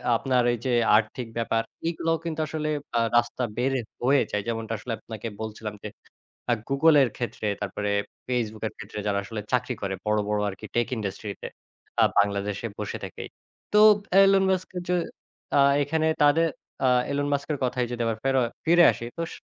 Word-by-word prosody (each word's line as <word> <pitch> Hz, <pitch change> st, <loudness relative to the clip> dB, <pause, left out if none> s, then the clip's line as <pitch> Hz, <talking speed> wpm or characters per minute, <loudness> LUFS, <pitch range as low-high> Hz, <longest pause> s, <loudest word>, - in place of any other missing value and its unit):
আপনার 125 Hz, +1 st, +2 dB
এই -, -, -2 dB
যে 125 Hz, -, +1 dB, 0.2 s
আর্থিক 115 Hz, +2 st, -2 dB
ব্যাপার। 115 Hz, -1 st, +1 dB, 0.3 s
এগুলোও 165 Hz, 0 st, 0 dB
কিন্তু 160 Hz, -1 st, -3 dB
আসলে 155 Hz, -1 st, -3 dB, 0.3 s
আ -, -, +4 dB, 0.2 s
রাস্তা 120 Hz, +1 st, 0 dB
বের 130 Hz, +2 st, +1 dB, 0.3 s
হয়ে 140 Hz, +2 st, +4 dB
যায়। 105 Hz, -, 0 dB
যেমনটা 115 Hz, -1 st, -3 dB
আসলে 115 Hz, +2 st, -5 dB
আপনাকে 110 Hz, 0 st, -7 dB
বলছিলাম 110 Hz, -1 st, -5 dB
যে, -, -, -4 dB, 0.6 s
আ -, -, +5 dB, 0.2 s
Google 150 Hz, +3 st, +5 dB
এর 120 Hz, -, +1 dB
ক্ষেত্রে, 120 Hz, -3 st, -3 dB
তারপরে 105 Hz, +1 st, -2 dB, 0.4 s
Facebook 110 Hz, -3 st, -2 dB
এর -, -, -8 dB
ক্ষেত্রে, 105 Hz, -, -7 dB
যারা 100 Hz, -1 st, +1 dB
আসলে 105 Hz, +1 st, -5 dB
চাকরি 125 Hz, 0 st, +1 dB
করে 95 Hz, -1 st, -2 dB
বড়, 105 Hz, 0 st, +2 dB
বড় 105 Hz, 0 st, +1 dB
আরকি 95 Hz, -, -9 dB
টেক 120 Hz, -1 st, +2 dB
ইন্ডাস্ট্রিতে, 100 Hz, -1 st, -5 dB, 0.5 s
আ -, -, +7 dB
বাংলাদেশে 100 Hz, +2 st, +1 dB
বসে 105 Hz, -4 st, -3 dB
থেকেই। -, -, -8 dB, 0.5 s
তো 210 Hz, -, +6 dB, 0.4 s
এলন 195 Hz, 0 st, +5 dB
মাস্ক 185 Hz, -1 st, -1 dB
এ -, -, -6 dB
যে 180 Hz, -, +3 dB, 0.6 s
আ -, -, +6 dB, 0.2 s
এখানে 160 Hz, +2 st, 0 dB, 0.2 s
তাদের 160 Hz, +3 st, +5 dB, 0.4 s
আ -, -, +5 dB, 0.2 s
এলন 145 Hz, 0 st, 0 dB
মাস্কের 145 Hz, +1 st, -1 dB
কথায় 125 Hz, 0 st, 0 dB
যদি 120 Hz, -1 st, -3 dB
আবার 115 Hz, -1 st, -1 dB
ফের 135 Hz, 0 st, +1 dB, 0.3 s
ফিরে 175 Hz, +1 st, +6 dB
আসি, 120 Hz, -, -7 dB
তো -, -, -2 dB
স -, -, -8 dB
120 Hz, 180 wpm, -26 LUFS, 105-145 Hz, 0.6 s, আ